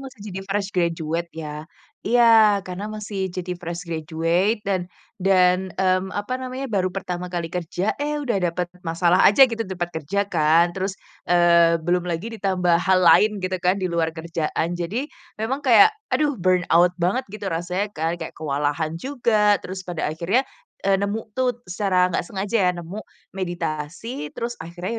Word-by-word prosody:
masih 230 - -20
jadi 190 - -4
fresh 200 0 -1
graduate 170 -1 -1
ya. 150 +1 -7 0.4
Iya, 225 -3 +5
karena 185 +2 -5
masih 205 -3 -4
jadi 180 0 -4
fresh 175 0 -6
graduate 165 +6 0
dan 195 -2 +1 0.4
dan, 185 0 +3
mmm, 185 0 +1
apa 205 +5 -3
namanya, 260 +1 -5
baru 185 -4 0
pertama 180 -2 -4
kali 170 -2 -2
kerja, 180 +3 -2
eh, 295 0 -1
udah 250 -7 -1
dapet 175 +1 -2 0.2
masalah 170 +2 +2
aja 265 +6 +7
gitu 230 -1 -2
ditempat 180 -3 -4
kerja 200 +8 -1
kan 165 +1 +3
terus, 190 +1 -1 0.3
eee, 170 -1 +4
belum 175 +2 +1
lagi 175 +5 -3
ditambah 180 -5 +1
hal 190 -1 +3
lain 175 +4 +6
gitu 185 0 -2
kan 185 +2 +2
di 185 - 0
luar 170 -1 0
kerjaan. 165 +1 -2
Jadi 205 +11 -3 0.3
memang 265 +6 -2
kayak 280 - +7 0.2
aduh 295 -2 +2
burn 185 -2 +1
out 175 +2 +5
banget 185 +10 +1
gitu 210 -2 -6
rasanya 180 +4 -2
kan, 160 +2 -1
kayak 160 - -6
kewalahan 150 +2 -2
juga 220 -6 +2
terus 185 +1 -6
pada 175 -3 -4
akhirnya, 180 +11 +1 0.4
eee, 195 -1 +3
nemu 210 +2 -3
tuh 250 -1 0
secara 185 -1 +1
nggak - - +1
sengaja 200 +3 -2
ya - - +4
nemu 175 +5 -7 0.4
meditasi, 170 - -4
terus 235 +1 -3
akhirnya 180 +7 -5
185 Hz, 165 wpm, -23 LUFS, 170-205 Hz, 0.4 s, aja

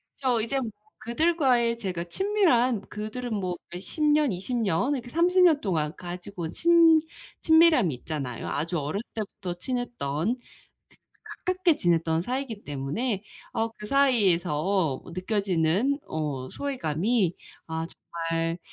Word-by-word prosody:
그쵸. 250 -5 +1
이제 270 +5 -1
뭐 235 -4 -4 0.3
그들과의 245 -3 +2
제가 180 -6 -3
친밀한 255 - +2
그들은 220 +3 -5
뭐 185 -4 -2
몇 175 +1 -7
10 310 - -5
년, 295 -4 +4
20 195 +7 -3
년 210 - +1
이렇게 245 -3 -4
30 360 +5 +3
년 320 -5 +6
동안 160 -6 -1
가지고 180 +1 -7
온 160 - -3
친 330 -2 +5 0.4
친밀함이 320 - +5
있잖아요. 130 -2 -5
아주 165 +4 -1
어렸을 155 +10 -3
때부터 200 -4 -5
친했던 230 - -2
그 245 - -22 1.0
가깝게 370 -4 +2
지냈던 165 -1 +1
사이이기 250 -2 -4
때문에 155 - -2 0.3
어 225 0 0
그 210 - -7
사이에서 190 - +2
느껴지는 190 - 0
어 145 -5 -3
소외감이 205 - 0 0.3
아 160 0 -3
정말 165 0 -3
210 Hz, 265 characters per minute, -27 LUFS, 170-260 Hz, 1.0 s, 년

